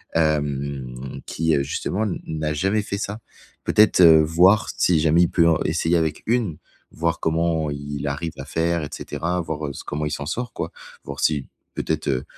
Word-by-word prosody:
hem, 70 -5 -1
qui, 80 -1 +1
heu, 70 - +1
justement 95 +8 -2
n 100 - -3
n'a 75 -1 -2
jamais 95 +7 +1
fait 100 0 -4
ça. 105 +1 -4 0.4
Peut-être, 105 -3 +4
heu, 80 -2 +8
voir 90 +7 +4
si 85 -3 +3
jamais 80 +3 +4
il - - +2
peut 85 -2 +4
en 80 - +3
essayer 85 +1 +1
avec 80 -2 -1
une, 110 -9 0 0.3
voir 85 0 -1
comment 80 -1 0
il 70 0 -5
arrive 75 +4 -3
à 70 - -6
faire 85 +2 0
et 75 - -5
cetera, 90 +2 -3
voir, 80 -2 -4
heu, - - -4
s - - -8
comment 75 +1 -3
il 75 - -2
s'en 70 0 -4
sort, 120 +7 -3
quoi, - - -4 0.3
voir - - -7
si 75 -3 +1 0.3
peut-être, 80 -2 -2
heu, 65 -1 0
80 Hz, 195 wpm, -23 LUFS, 75-85 Hz, 0.4 s, heu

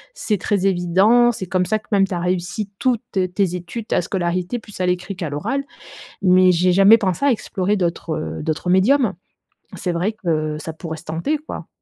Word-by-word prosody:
c'est 215 - -1
très 200 -1 0
évident, 195 +6 +4
c'est 195 - -5
comme 180 0 0
ça 215 - +1
que 215 - -16
même, 195 -2 +3
tu 190 - -5
as - - -2
réussi 180 +4 -2
toutes 245 -4 +1
tes 185 -1 0
études, 180 +6 -6
ta - - +1
scolarité, 180 +3 -2
plus 210 -4 -12
à - - +2
l'écrit 180 +2 -2
qu'à 170 -4 -4
l'oral». 270 - -2 0.6
Mais 185 -1 +5
j'ai 180 +1 +2
jamais 195 +4 +7
pensé 195 +3 -1
à 280 - +5
explorer 205 -3 -1
d'autres, 170 -3 -2
heu, 155 - -5
d'autres 160 +3 -2
médiums. 225 +6 +4 0.6
C'est 180 - -2
vrai 180 +6 0
que 155 -3 -1
ça 160 +1 -6
pourrait 160 -1 -6
se 165 - -14
tenter, 170 - -1
quoi. 305 - -8
185 Hz, 200 wpm, -20 LUFS, 175-210 Hz, 0.6 s, jamais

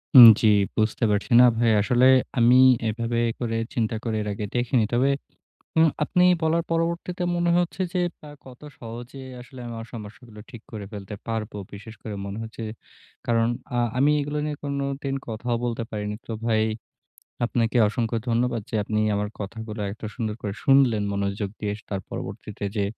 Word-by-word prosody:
হুম। 125 -3 +13
জি। 110 - +4 0.3
বুঝতে 110 +2 +1
পারছি 105 +5 -1
না 125 - +9
ভাই। 115 -1 +3
আসলে 125 +4 +3 0.3
আমি 120 +1 +6 0.3
এভাবে 115 +2 -2 0.2
করে 115 -2 -1 0.2
চিন্তা 110 -1 0
করে 110 -2 -1
এর 105 - -4
আগে 105 +1 -4
দেখিনি। 120 -1 +2
তবে 130 +3 +3 0.7
উম 160 0 +6 0.2
আপনি 180 +3 +2 0.2
বলার 165 +1 +2
পরবর্তীতে 170 +2 -1
মনে 175 0 +1
হচ্ছে 175 +2 -2
যে 180 - 0 0.3
আ - - -10 0.2
কত 125 -1 -13 0.2
সহজে 120 +3 -8 0.2
আসলে 125 +1 -12
আমার 115 -1 -6
সমস্যাগুলো 110 0 -10
ঠিক 120 -4 -11
করে 105 -2 -6
ফেলতে 100 0 -7
পারব। 115 -1 -3 0.2
বিশেষ 110 +2 -10
করে 110 - -5
মনে 100 +2 -5
হচ্ছে 115 0 -8 0.6
কারণ 115 -1 +2 0.3
আ - - +1 0.2
আমি 145 +3 +4
এগুলো 145 +1 -3
নিয়ে 150 -1 -3
কোনোদিন 140 -1 -2
কথাও 115 +2 -2
বলতে 120 -1 -2
পারিনি। 105 -1 -3
তো 115 - -5
ভাই 110 -1 +3 0.8
আপনাকে 115 0 0
অসংখ্য 115 +2 -1
ধন্যবাদ 120 0 +1
যে - - -7
আপনি 105 0 -1
আমার 105 0 -1
কথাগুলো 110 +1 -6
এত 110 - -14
সুন্দর 110 -4 -3
করে 100 -2 -3
শুনলেন 135 -6 +4
মনোযোগ 100 0 -2
দিয়ে। 105 -1 -1 0.2
তার 100 -2 -2
পরবর্তীতে 105 -1 -6
যে 100 - +1
115 Hz, 165 wpm, -25 LUFS, 110-130 Hz, 0.8 s, হুম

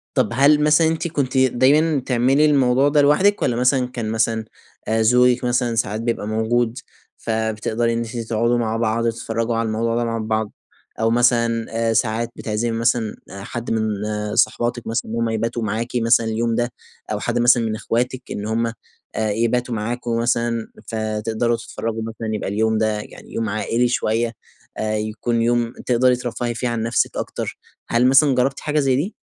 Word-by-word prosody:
طب 105 - +2
هل 145 +4 +4
مثلًا 155 +2 +4
أنتِ 160 +1 -1
كنتِ 140 -5 -2
دايمًا 135 +4 +3
تعملي 130 +4 +3
الموضوع 135 -2 +3
ده 145 0 +4
لوحدِك؟ 185 +9 +3
والّا 125 -3 +1
مثلًا 125 +1 +2
كان 120 -3 -4
مثلًا، 110 0 0 0.4
آآ، 110 0 +1
زوجِك 125 +2 +4
مثلًا 120 -1 0
ساعات 110 0 -1
بيبقى 115 -3 -2
موجود، 115 +2 0 0.4
فبتقدري 110 +1 -1
إن - - -1
أنتِ 115 +1 -5
تقعدوا 115 +1 0
مع 115 -1 -1
بعض 115 0 0
وتتفرجوا 115 0 -2
على 115 0 0
الموضوع 115 +1 -1
ده 120 - 0
مع 115 0 -2
بعض، 110 -1 -2 0.5
أو 115 - +2
مثلًا، 115 -1 +2 0.2
آآ، 115 - +2
ساعات 115 +1 0
بتعزمي 110 +2 -2
مثلًا 115 -2 0
حد 100 +5 -6
من 110 -1 0 0.4
صحباتِك 120 0 +1
مثلًا 115 -1 -2
إن - - -3
هُم 115 -1 0
يباتوا 115 +1 -2
معاكِ 110 +3 -2
مثلًا 115 -1 +3
اليوم 115 +1 0
ده، 120 0 0 0.4
أو - - -1
حد - - -1
مثلًا 120 0 +5
من 110 -1 -1
إخواتِك 125 +4 -2
إن 105 - -4
هُم 115 +1 0 0.5
آآ 110 -1 0
يباتوا 115 +2 0
معاكم 115 +2 -2
مثلًا، 115 -1 0 0.2
فتقدروا 110 +1 -1
تتفرجوا 115 0 -5
مثلًا 110 -1 -4
يبقى 105 - -3
اليوم 110 +2 +1
ده 110 -1 0
يعني - - -11
يوم 115 -2 -2
عائلي 115 +3 0
شوية، 115 -1 0 0.4
آآ 110 0 -1
يكون 110 +2 -2
يوم 120 0 +1
تقدري 125 +1 +3
ترفّهي 120 -1 -3
فيه 125 +1 -2
عن 115 -2 -2
نفسِك 115 +1 0
أكتر، - - -4 0.3
هل 120 +2 +3
مثلًا 135 +1 +5
جربتِ 135 +2 +1
حاجة 150 0 0
زي 135 -2 +2
دي؟ 165 - -2
115 Hz, 175 wpm, -21 LUFS, 110-125 Hz, 0.5 s, مثلًا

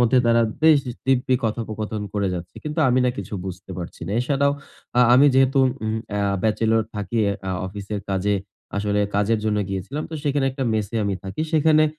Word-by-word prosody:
মধ্যে 120 +1 +4
তারা 115 0 +4 0.2
বেশ 160 -2 +7 0.3
দিব্যি 130 0 +2
কথোপকথন 110 -1 -3
করে 100 -2 0
যাচ্ছে! 85 0 -7
কিন্তু 150 +1 -4
আমি 125 +1 +3
না 125 - +3
কিছু - - -5
বুঝতে 95 0 -7
পারছি 85 - -7
না। 100 - -3
এছাড়াও 140 +2 +2 0.5
আ - - +7
আমি 135 +3 +7
যেহেতু 135 +1 +4 0.3
উম 110 0 -1 0.2
আ - - 0 0.2
bachelor 110 +1 +2
থাকি 105 +2 -4
এ - - 0 0.2
আ - - -1 0.2
অফিসের 100 +1 -5
কাজে, 100 +1 +1 0.4
আসলে 105 0 0
কাজের 105 +2 +2
জন্য 105 -1 +1
গিয়েছিলাম। 100 +11 -4
তো - - -5
সেইখানে 145 -2 +1
একটা 135 0 -3
মেসে 105 +1 -2
আমি 100 - 0
থাকি। 95 +11 -3
সেখানে 155 0 +5
110 Hz, 185 wpm, -23 LUFS, 100-135 Hz, 0.5 s, বেশ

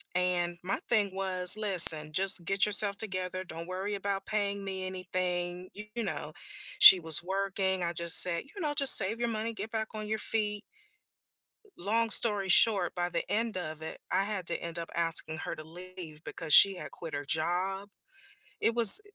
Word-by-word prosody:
and 175 -1 -4
my 195 +2 -6
thing 205 -5 -2
was, 185 -1 +3
"Listen, 170 -7 +7
just 190 +2 +3
get 195 +4 -2
yourself 205 -1 +3
together, 185 -3 -8
don't 165 -1 -13
worry 190 +3 -8
about 195 0 -7
paying 200 -1 -6
me 190 -1 -8
anything," 180 -1 -7
you 210 +3 -10
know, - - -9 0.5
she 185 - +7
was 160 -1 +3
working. 190 0 -5
I 170 - -5
just 170 0 +7
said, 170 -2 +1
you 355 +9 -16
know, 300 -2 -5
"Just 280 -2 +8
save 220 +3 -2
your 235 - -4
money, 225 +1 -7
get 220 - -10
back 220 -1 -7
on 215 -1 -9
your 220 +1 -5
feet." 210 -2 -4 1.1
Long 225 +5 -4
story 205 -4 +4
short, 195 -2 0
by 175 0 -6
the - - -6
end 225 -1 -4
of 155 -3 -9
it, 160 - -11
I 195 - -2
had 205 -4 -7
to - - -6
end 170 0 -10
up 170 -1 -10
asking 165 -1 -3
her - - -9
to 155 - -13
leave 170 -1 -14
because 160 -2 -7
she 195 -1 +4
had - - -12
quit 165 -2 -11
her 145 0 -9
job. 180 +6 -6 0.7
It 230 - -2
was 235 - +9
190 Hz, 185 wpm, -26 LUFS, 175-210 Hz, 1.1 s, was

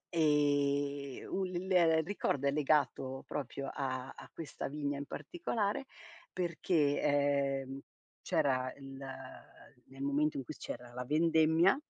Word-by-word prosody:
Ehm, 145 -2 +2
un 190 0 +1
l 185 +1 -4
il 165 -3 +5
ricordo 145 -7 -1
è - - +4
legato 140 -3 +1
proprio 140 -1 -4
a 130 -1 -2
a - - -11
questa 165 -3 -5
vigna 145 0 -2
in 145 - -4
particolare 235 - -2 0.5
perché, 170 -4 +1
ehm, 140 -1 +1 0.4
c'era 130 -2 +1
il 135 -1 -9 0.9
nel 135 +1 -12
momento 145 +1 +1
in 135 - -3
cui 155 - -6
c'era 120 -2 -7
la 125 0 -4
vendemmia 160 - +4
145 Hz, 125 wpm, -34 LUFS, 135-160 Hz, 0.9 s, il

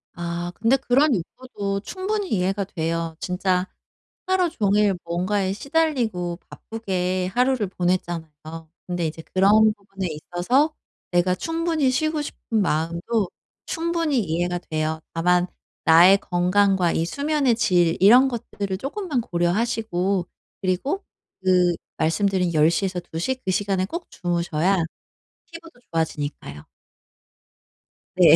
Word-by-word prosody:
아 175 0 -4
근데 235 +4 +3
그런 270 +1 +3
욕구도 200 +1 -4
충분히 385 - -3
이해가 195 +1 0
돼요. 165 -2 -3
진짜 180 0 0 0.6
하루 370 -2 +2
종일 205 - +2
뭔가에 185 +3 0
시달리고 230 - -1
바쁘게 185 -4 -2
하루를 250 -4 +2
보냈잖아요. 175 -3 -2 0.6
근데 175 -2 -2
이제 160 +1 -6
그런 210 +3 +5
부분에 195 -2 -6
있어서 180 - 0 0.4
내가 180 +1 +2
충분히 325 - 0
쉬고 310 +3 0
싶은 225 -6 -2
마음도 170 +5 0 0.4
충분히 330 -5 0
이해가 175 0 -1
돼요. 155 -1 -2
다만 180 +2 +2 0.4
나의 175 +5 +8
건강과 180 0 +2
이 165 - 0
수면의 285 - +1
질 175 -6 +2
이런 245 +8 +7
것들을 205 -5 -4
쪼끔만 285 - -2
고려하시고 190 0 0 0.3
그리고 195 - -1 0.4
그 180 -2 +4 0.2
말씀드린 180 +2 +1
10:00 165 +5 +3
에서 185 -1 -2
2:00 175 +9 -3
그 185 - +1
시간에 190 -1 0
꼭 340 - -6
주무셔야 175 +1 0 0.7
피부도 330 -5 -12
좋아지니까요. 145 - -3 1.5
네. - - +7
190 Hz, 265 characters per minute, -23 LUFS, 175-245 Hz, 1.5 s, 나의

